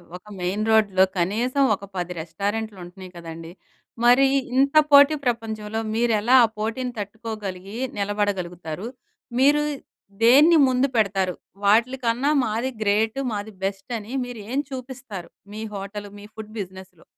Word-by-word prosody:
ఒక 180 - -10 0.2
మెయిన్ 190 +4 -1
రోడ్‌లో 200 -4 +4 0.2
కనీసం 240 +10 +1
ఒక 200 - -11
10 180 0 -3
రెస్టారెంట్లు 205 +5 -3
ఉంటున్నాయి 180 +1 -11
కదండీ, 165 0 -9 0.5
మరి 250 +3 +6 0.3
ఇంత 275 +2 +3 0.2
పోటీ 285 +2 +8
ప్రపంచంలో 220 -2 -2 0.2
మీరు 235 0 +2
ఎలా 245 +4 +4
ఆ - - -1
పోటీని 240 +3 -3
తట్టుకోగలిగి 205 -2 -6 0.2
నిలబడగలుగుతారు? 195 -3 -2 0.5
మీరు 290 +3 +5 0.6
దేన్ని 295 +8 +7
ముందు 255 +2 +2
పెడతారు? 195 -4 +1 0.3
వాటిలికన్నా 240 +5 +2
మాది 230 +5 -2
గ్రేట్, 215 +4 +1
మాది 210 +1 -5
బెస్ట్ 195 +3 -4
అని 215 +5 -10
మీరు 245 -2 -8
ఏం 275 - 0
చూపిస్తారు? 255 -7 -7 0.2
మీ 215 +1 -5
హోటల్, 200 +1 -6
మీ 205 - -11
ఫుడ్ 215 -1 -9
బిజినెస్‌లో? 185 -2 -11
215 Hz, 130 wpm, -23 LUFS, 195-245 Hz, 0.6 s, పోటీ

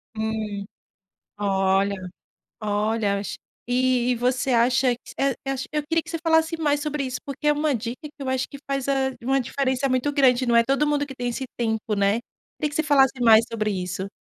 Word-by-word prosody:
Hum. 215 -2 -3 0.7
Olha, 195 0 +2 0.7
olha 210 -1 0
es 200 - -5 0.3
e 250 0 +2
e 245 - +2
você 250 +2 0
acha 245 +1 +3
que 240 - -12
eh 275 0 +2 0.2
eh 270 - 0 0.2
Eu 300 0 0
queria 330 0 +1
que - - -12
você 330 - -2
falasse 320 0 +2
mais 290 -2 +1
sobre 300 -2 -2
isso, 255 -1 -3
porque 280 +1 -4
é 295 - +5
uma 295 0 +1
dica 235 +1 -4
que 300 - -7
eu 275 - -5
acho 260 0 0
que 280 - -9
faz 275 -1 -1 0.4
uma 270 +2 +2
diferença 265 +1 0
muito 255 +3 +1
grande. 260 -3 +3
Não 235 -1 +2
é 230 - +6
todo 275 +3 +2
mundo 290 -1 +1
que 270 - -9
tem 245 -1 -2
esse 250 +2 -4
tempo, 220 -2 -1
né. 200 +1 +2 0.4
Queria 300 - 0
que 290 - -9
você 315 - +1
falasse 270 -3 +3
mais 225 -1 +7
sobre 215 -2 -1
isso. 185 0 -3
255 Hz, 205 wpm, -24 LUFS, 220-280 Hz, 0.7 s, mais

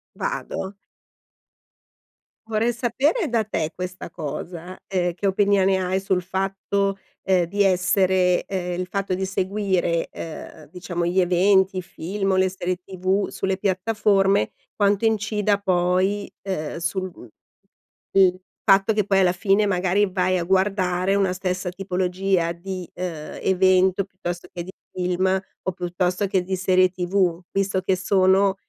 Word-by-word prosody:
Vado. 205 - -4 1.7
Vorrei 225 +2 +1
sapere 270 - 0
da 230 -2 +1
te 160 -7 -2
questa 180 -1 -6
cosa: 170 +3 -6
ehm, 180 -2 0
che 195 +3 -2
opinione 195 -1 +3
hai 185 +1 0
sul 190 -1 0
fatto, 195 +1 -1 0.2
ehm, 185 -2 +2
di 200 +4 +1
essere, 185 -1 +2
ehm, 180 -2 -3
il 185 - -3
fatto 195 0 -2
di 190 +1 -1
seguire, 190 -3 0
ehm, 155 -1 -9
diciamo 175 -1 -3
gli 175 +2 +1
eventi, 190 +2 +3
i - - -1
film 195 +3 -3
o - - +2
le 185 0 +3
serie 185 -1 -3
TV 190 +2 -1
sulle 190 0 -2
piattaforme, 195 0 +2 0.2
quanto 205 +1 +2
incida 210 -2 +1
poi, 185 +2 +1
uhm, 170 -7 -3
sul 185 +2 -2
mhmm, 125 - -13 0.9
il 185 -1 +5 0.3
fatto 195 +3 +5
che 210 0 +2
poi 195 -1 +3
alla 185 -2 +4
fine, 195 +3 +2
magari, 190 +1 +2
vai 185 0 +1
a - - -1
guardare 190 0 +1
una 195 -2 +2
stessa 185 0 -2
tipologia 185 -1 0
di, 180 +1 -6
uhm, 170 -4 -5
evento 185 0 +3
piuttosto 175 -2 -6
che 175 -1 -5
di 185 - -9 0.2
film, 180 0 -1 0.4
o 185 - -1
piuttosto 180 +2 -1
che 190 -1 +1
di 190 +1 -2
serie 185 0 +3
TV? 180 -1 0
Visto 195 -1 0
che 190 0 +1
sono, 190 +1 +3
190 Hz, 140 wpm, -23 LUFS, 180-195 Hz, 1.7 s, il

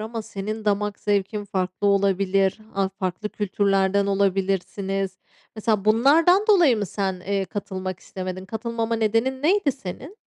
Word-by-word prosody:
ama 220 +1 -5
senin 215 +2 -5
damak 205 0 0
zevkin 205 0 -1
farklı 190 -1 -2
olabilir, 195 0 +2 0.2
a 195 -1 +1
farklı 190 +2 -4
kültürlerden 200 -1 +1
olabilirsiniz; 195 0 -1 0.4
mesela 215 -2 0
bunlardan 305 - +5
dolayı 345 - +6
mı 205 -2 -2
sen, 190 -1 -3
eee, 195 +1 -1
katılmak 185 -2 -5
istemedin? 185 0 -6
Katılmama 230 +2 -2
nedenin 230 +5 0
neydi 345 -2 +3
senin? 265 - -8
200 Hz, 130 wpm, -24 LUFS, 190-225 Hz, 0.4 s, dolayı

